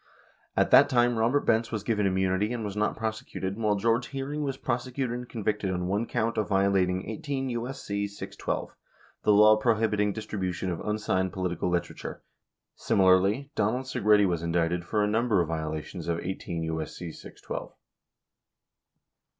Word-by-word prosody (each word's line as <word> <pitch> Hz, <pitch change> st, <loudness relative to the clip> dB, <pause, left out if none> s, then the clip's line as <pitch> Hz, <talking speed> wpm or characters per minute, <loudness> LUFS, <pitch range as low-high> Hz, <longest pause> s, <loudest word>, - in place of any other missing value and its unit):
At -, -, +3 dB
that -, -, +8 dB
time, 120 Hz, -2 st, +3 dB
Robert 120 Hz, +6 st, +3 dB
Benz 115 Hz, 0 st, +2 dB
was 110 Hz, -3 st, -3 dB
given 105 Hz, -3 st, +1 dB
immunity 95 Hz, +3 st, +1 dB
and 120 Hz, -3 st, -3 dB
was 100 Hz, -1 st, -4 dB
not 105 Hz, 0 st, 0 dB
prosecuted, 110 Hz, -3 st, -3 dB
while 105 Hz, -1 st, +1 dB
George 115 Hz, +4 st, +1 dB
Hearing 140 Hz, +3 st, -4 dB
was 135 Hz, -2 st, -2 dB
prosecuted 125 Hz, 0 st, -2 dB
and 125 Hz, 0 st, -7 dB
convicted 105 Hz, -3 st, -1 dB
on 90 Hz, -1 st, -1 dB
one 100 Hz, +5 st, 0 dB
count 115 Hz, 0 st, 0 dB
of 105 Hz, -, -1 dB
violating 95 Hz, -2 st, +2 dB
18 135 Hz, +4 st, -3 dB
U.S.C. 120 Hz, -4 st, -3 dB
612, 100 Hz, 0 st, -5 dB, 0.5 s
the -, -, +3 dB
law 105 Hz, +1 st, +7 dB
prohibiting 110 Hz, -2 st, +2 dB
distribution 95 Hz, -4 st, -3 dB
of 85 Hz, -, -3 dB
unsigned 100 Hz, -3 st, 0 dB
political 90 Hz, -1 st, -1 dB
literature. 85 Hz, 0 st, -3 dB, 0.5 s
Similarly, 95 Hz, +8 st, +3 dB
Donald 110 Hz, +5 st, 0 dB
Segretti 105 Hz, -5 st, +3 dB
was 85 Hz, -3 st, 0 dB
indicted 85 Hz, +1 st, 0 dB
for 105 Hz, +3 st, +1 dB
a -, -, +2 dB
number 110 Hz, -1 st, +2 dB
of 85 Hz, -2 st, 0 dB
violations 80 Hz, +2 st, -4 dB
of 85 Hz, -1 st, 0 dB
18 85 Hz, -2 st, -4 dB
U.S.C. 80 Hz, +1 st, -4 dB
612. -, -, -8 dB
105 Hz, 150 wpm, -28 LUFS, 95-115 Hz, 0.5 s, that